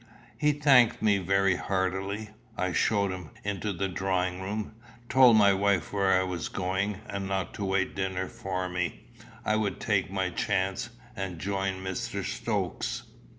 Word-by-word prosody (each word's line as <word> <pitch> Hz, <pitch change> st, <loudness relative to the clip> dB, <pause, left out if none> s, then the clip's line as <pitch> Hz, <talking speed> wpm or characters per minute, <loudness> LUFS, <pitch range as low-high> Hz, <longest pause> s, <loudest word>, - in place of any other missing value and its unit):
He 150 Hz, -1 st, +3 dB
thanked 135 Hz, -7 st, +5 dB
me 105 Hz, -2 st, +4 dB
very 95 Hz, 0 st, +2 dB
heartily. 95 Hz, +3 st, -2 dB, 0.3 s
I 90 Hz, -1 st, 0 dB
showed 100 Hz, -1 st, +2 dB
him 90 Hz, -4 st, -6 dB
into 100 Hz, +1 st, -2 dB
the 95 Hz, +1 st, -1 dB
drawing 95 Hz, -1 st, -1 dB
room, 105 Hz, +3 st, -4 dB, 0.4 s
told 125 Hz, -4 st, +7 dB
my 100 Hz, -2 st, +6 dB
wife 100 Hz, -4 st, +1 dB
where 95 Hz, -2 st, +3 dB
I -, -, +1 dB
was 90 Hz, -3 st, -3 dB
going, 95 Hz, +2 st, -1 dB
and 100 Hz, -1 st, -4 dB
not 95 Hz, -1 st, -2 dB
to 100 Hz, -, -3 dB
wait 95 Hz, 0 st, 0 dB
dinner 95 Hz, -1 st, -1 dB
for 95 Hz, -6 st, -3 dB
me 90 Hz, 0 st, -3 dB, 0.4 s
I 105 Hz, -, +2 dB
would 105 Hz, -2 st, -1 dB
take 100 Hz, -4 st, +1 dB
my 95 Hz, -1 st, -1 dB
chance 95 Hz, +5 st, -1 dB, 0.3 s
and 95 Hz, -3 st, -4 dB
joined 95 Hz, +1 st, -2 dB
Mr. 95 Hz, -1 st, -3 dB
Stokes. -, -, -2 dB
95 Hz, 155 wpm, -28 LUFS, 95-100 Hz, 0.4 s, told